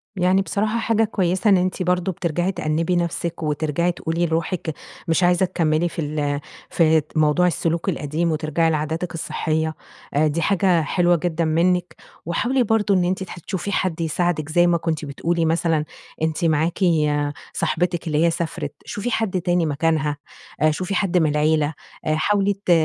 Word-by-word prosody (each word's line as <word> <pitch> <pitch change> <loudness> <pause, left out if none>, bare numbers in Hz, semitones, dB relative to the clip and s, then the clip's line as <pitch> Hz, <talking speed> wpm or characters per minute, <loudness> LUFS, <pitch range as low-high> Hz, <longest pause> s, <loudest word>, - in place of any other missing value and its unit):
يعني 185 +1 +3
بصراحة 215 +3 -1
حاجة 225 -1 +2
كويّسة، 190 -1 +1
إن 195 - +6
أنتِ 185 +1 -1
برضو 180 +1 +1
بترجعي 175 +1 -1
تأنّبي 165 0 -1
نفسك 170 -1 -2
وترجعي 155 +3 0
تقولي 170 0 -1
لروحك 165 0 -2 0.3
مش 165 +2 +2
عايزة 175 +1 +4
تكمّلي 170 -2 +1
في 170 - -8
ال 145 -1 -1 0.3
في 160 -1 +4
د - - -6
موضوع 155 +3 +3
السلوك 170 +1 -1
القديم، 160 0 -1
وترجعي 155 +1 +1
لعاداتِك 160 +3 -2
الصحية 160 -1 -2 0.4
آآ 155 +2 +3
دي 155 +3 -1
حاجة 185 -2 +3
حلوة 175 +3 +2
جدًا 170 0 -1
مِنك، 175 +3 +1 0.3
وحاولي 245 +10 +1
برضو 215 -2 +2
إن 185 -2 +3
أنتِ 185 +2 -1
تح 180 - -9
تشوفي 190 +3 -4
حد 180 -4 -1
يساعدك، 160 -1 -1
زي 175 +2 +4
ما 175 -1 +3
كنتِ 160 -2 -2
بتقولي 165 +4 -1
مثلًا 160 -1 +1 0.4
أنتِ 160 +2 0
معاكِ 160 +1 +1 0.7
صاحبتِك 175 0 -1
اللي 155 +1 +2
هي 170 - +3
سافرت. 165 0 -4
شوفي 225 +4 -4
حد 190 -5 0
تاني 175 -1 +1
مكانها، 155 0 0 0.4
آآ 155 - +5
شوفي 185 +5 -3
حد 185 -1 +1
من 160 -3 +3
العيلة. 150 0 +1 0.3
آآ 155 - +1
حاولي 200 +5 +2
ت - - +2
170 Hz, 165 wpm, -22 LUFS, 155-180 Hz, 0.7 s, إن